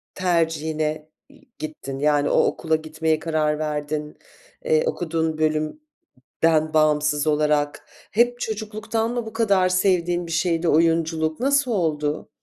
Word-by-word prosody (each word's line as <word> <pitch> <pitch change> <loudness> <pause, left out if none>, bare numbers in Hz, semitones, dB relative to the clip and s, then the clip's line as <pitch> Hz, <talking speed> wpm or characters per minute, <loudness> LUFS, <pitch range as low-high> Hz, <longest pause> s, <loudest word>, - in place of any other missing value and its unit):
tercihine 160 -3 -1 0.2
y 285 +1 -20 0.2
gittin, 140 -3 -6
yani, 145 -1 +2
o - - +4
okula 160 -1 0
gitmeye 155 0 -1
karar 155 -2 0
verdin? 150 0 -3 0.5
Eee, 470 -1 +3
okuduğun 160 - -1
bölümden 155 - -2 0.7
bağımsız 150 -1 +2
olarak? 150 -1 +1 0.3
Hep 240 +2 +2
çocukluktan 220 +1 -3
mı 240 -2 -2
bu 220 - -8
kadar 200 -5 +2
sevdiğin 175 -2 +1
bir - - -7
şeydi 165 0 0
oyunculuk? 160 0 +1
Nasıl 275 0 +2
oldu? 155 -6 -1
160 Hz, 120 wpm, -23 LUFS, 155-195 Hz, 0.7 s, o